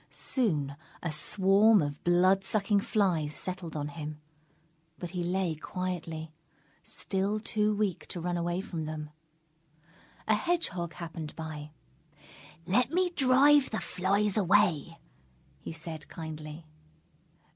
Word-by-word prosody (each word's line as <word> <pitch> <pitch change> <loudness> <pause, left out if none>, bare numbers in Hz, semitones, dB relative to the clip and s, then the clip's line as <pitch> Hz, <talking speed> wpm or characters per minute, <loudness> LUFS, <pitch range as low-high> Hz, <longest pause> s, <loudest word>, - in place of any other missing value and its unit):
Soon 150 - 0 0.3
a 165 - -1
swarm 195 +7 +4
of 145 0 -5
blood 185 +2 +4
sucking 200 +1 +2
flies 180 -9 +1
settled 180 -3 -5
on 145 -1 -2
him; 150 0 -6 0.8
but 175 - -6
he 180 -2 -2
lay 180 -1 0
quietly, 165 -1 -5 0.5
still 200 +2 +1
too 210 -1 0
weak 200 -4 -1
to 175 - -5
run 175 +1 -2
away 175 +1 -1
from 165 -5 -5
them. 155 -1 -5 1.2
A 215 - +5
Hedgehog 210 - -1
happened 165 -2 -7
by. 155 -2 -6 1.0
"Let 240 +6 +2
me 355 +3 +1
drive 280 -1 +5
the 220 - -2
flies 200 +3 0
away," 180 -5 +3 0.6
he - - -7
said 165 -1 -7
kindly. 155 0 -7
180 Hz, 120 wpm, -30 LUFS, 160-205 Hz, 1.2 s, A